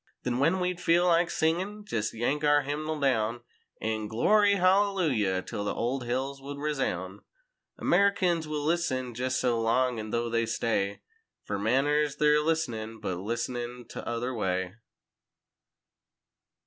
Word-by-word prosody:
Then 125 0 -1
when 165 +7 +3
we'd 180 -1 -2
feel 175 0 +3
like 170 0 +3
singin' 190 +6 -1
jest 110 - -2
yank 135 +6 -1
our 145 -1 +4
hymnal 155 +2 -3
down 120 -4 +1 0.4
An' 110 -1 -2
"Glory 200 - +4
Hallelujah" 180 - +2
'till 100 - -5
the 105 - -2
old 125 +2 -2
hills 135 +3 -2
would 140 +1 -7
resoun'— 130 - -2 0.6
Americans 185 -5 +2
will 150 -1 -3
listen 140 -7 0
jest 130 +2 -1
so 120 -3 +1
long—an' 115 -1 +1
though 120 +1 -1
they 115 0 0
stay 100 -3 -1 0.4
Fer 100 -1 -3
manners—they're 150 +5 +2
listenin', 115 -9 -2
but 95 -4 -3
listenin' 120 +3 -4
tother 120 +2 -4
way. 95 -4 -1
130 Hz, 130 wpm, -28 LUFS, 115-160 Hz, 0.6 s, our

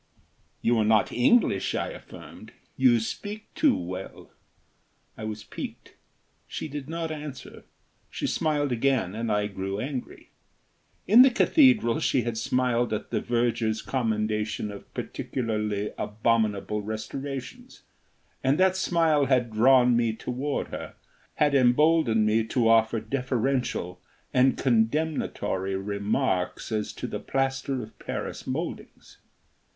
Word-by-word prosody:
"You 115 0 +3
are - - +3
not 110 0 +3
English," 120 - +2
I - - -1
affirmed. - - -12 0.2
"You 125 -3 +4
speak 210 - -6
too 300 -4 +3
well." 90 +2 -7 0.8
I 110 - -7
was 110 0 -5
piqued. - - -8 0.5
She - - -5
did 145 -1 -7
not 165 -1 -3
answer. 150 -3 -8 0.4
She - - -4
smiled 145 -3 0
again 120 -6 +1
and 115 +1 -2
I 105 0 +1
grew 95 0 -4
angry. 130 +1 -6 0.8
In 220 +7 +8
the 265 - +8
cathedral 255 - +4
she 125 - +1
had 120 -1 -3
smiled 120 0 0
at 105 - -4
the - - 0
verger's 115 -2 0
commendation 110 -3 -1
of 100 - -11
particularly 105 -4 -3
abominable 105 -1 0
restorations, 125 +6 -6 0.6
and 135 +2 +3
that 185 0 +3
smile 165 -6 +2
had 125 -3 +1
drawn 125 +2 +5
me 115 -1 +1
toward 130 +5 -3
her, - - -7 0.4
had 145 -1 +2
emboldened 130 -3 +4
me 110 +1 +2
to 115 +1 +1
offer 115 0 +4
deferential 125 -6 -2 0.3
and 130 0 +4
condemnatory 110 -6 0
remarks 100 +1 -1
as 110 -1 -1
to - - -6
the - - -4
plaster 135 -1 -1
of 110 - -14
Paris - - -5
mouldings. - - -6
120 Hz, 125 wpm, -26 LUFS, 110-140 Hz, 0.8 s, In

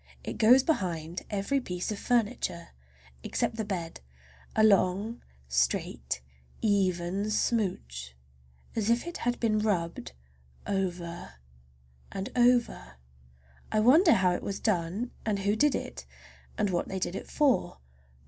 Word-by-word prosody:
It - - -6
goes 250 +4 +7
behind 175 - -1
every 210 +7 0
piece 180 -3 -4
of 205 - -4
furniture, 230 -7 0 0.5
except 225 - -2
the 220 - -1
bed, 175 -5 -4 0.6
a 220 - +4
long, 205 +2 +3 0.3
straight, 65 0 0 0.4
even 195 -1 +1
smooch, 65 - -1 0.6
as 220 -1 0
if 235 +4 +2
it 345 0 -5
had 240 0 -1
been 215 -2 +2
rubbed 170 - -1 0.5
over 175 - -3 0.8
and 195 0 -4
over. 240 - +2 0.8
I 215 - +2
wonder 305 - +6
how 185 -3 +3
it 180 - -2
was 200 - -4
done 195 +4 -1
and 215 -2 0
who 200 +2 +1
did 295 +5 +3
it, - - -6 0.5
and 205 -2 +1
what 175 - -1
they 190 - -4
did 180 - -2
it - - -6
for. 285 - +2
200 Hz, 130 wpm, -29 LUFS, 175-230 Hz, 0.8 s, goes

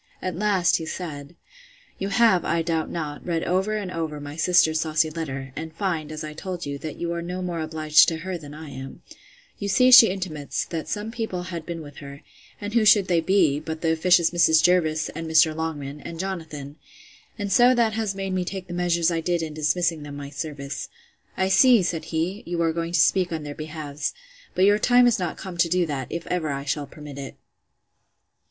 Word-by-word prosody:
At 185 - -4
last, 195 -2 +2
he 160 - -6
said, 155 -3 -6 0.6
You 195 - -2
have, 220 -4 +4
I 165 0 0
doubt 160 -1 -1
not, 150 -3 -5
read, 165 -2 -1
over 190 +4 0
and 195 -3 -4
over, 160 -3 -4
my 145 0 -8
sister's 160 -1 +3
saucy 155 0 +1
letter; 135 -5 -5
and 160 0 -6
find, 165 -6 -2
as 155 0 -6
I 155 0 -6
told 180 +2 -6
you, 140 0 -5
that 155 0 -6
you 170 0 -3
are 170 - -3
no 180 +2 -5
more 175 -2 -3
obliged 155 -1 +4
to 165 - -1
her 185 +3 -5
than 150 -4 -9
I 155 -2 -9
am. 135 0 -9 0.6
You 200 - -3
see 250 +6 +4
she 250 -2 +11
intimates, 180 -7 -3
that 165 -2 -5
some 210 +1 -4
people 220 -6 -4
had 170 -3 -7
been 170 -2 -5
with 145 -2 -12
her; 140 -1 -10 0.4
and 205 0 -5
who 230 -2 +3
should 205 -2 +5
they 170 -2 +3
be, 165 -5 +3
but 160 +1 -6
the 165 - +1
officious 170 +1 +3
Mrs. 160 -2 +4
Jervis, 165 -3 +2
and 165 +1 -6
Mr. 160 0 +4
Longman, 150 -3 -4
and 165 +2 -8
Jonathan! 160 -6 -5 0.6
and 205 -2 -4
so 245 +3 +6
that 230 -2 +2
has 215 -3 -2
made 195 -1 -3
me 185 -1 0
take 185 0 -5
the 175 - -8
measures 175 -1 +1
I 165 -1 -1
did 175 0 0
in 155 -1 -5
dismissing 155 +2 0
them 145 -1 -8
my 140 0 -7
service.—I 145 +5 -6
see, 220 +3 +6
said 170 -2 -2
he, 175 +6 -2
you 175 0 -3
are 165 -1 +1
going 165 +1 -3
to 175 - +3
speak 180 +3 +3
on 160 -2 -3
their 145 -1 -6
behalfs; 155 -1 -5 0.4
but 185 - +4
your 205 +1 +4
time 245 +1 +5
is 240 -4 +3
not 180 - -3
come 185 -2 -8
to 170 0 +3
do 180 +1 +2
that, 140 -5 -4
if 170 - -4
ever 175 -4 -2
I 140 0 -3
shall 145 0 -2
permit 150 -3 -10
it. 135 - -7
165 Hz, 215 wpm, -24 LUFS, 155-185 Hz, 0.6 s, she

